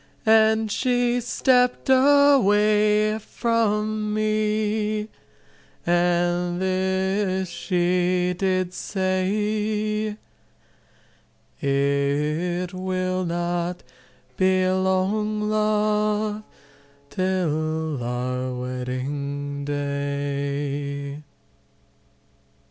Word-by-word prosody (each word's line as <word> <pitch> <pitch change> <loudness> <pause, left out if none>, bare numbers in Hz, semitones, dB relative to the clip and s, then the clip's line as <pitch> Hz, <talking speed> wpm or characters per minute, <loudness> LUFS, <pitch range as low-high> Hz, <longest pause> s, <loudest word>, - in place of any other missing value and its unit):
And 220 0 +4
she 245 0 +1
stepped 250 +1 +2
away 215 -6 +4
from 215 -2 -1
me 215 0 0 0.8
and 175 0 +1
this 190 +1 0
she 180 0 0
did 185 -1 0
say 210 +3 -1 1.4
It 145 +6 0
will 185 0 -2
not 175 +1 -2 0.5
be 185 0 +3
long, 190 +3 0
love, 210 0 0 0.7
till 160 -5 -1
our 125 +1 -3
wedding 140 +3 -4
day." 140 0 -3
185 Hz, 55 wpm, -23 LUFS, 155-215 Hz, 1.4 s, And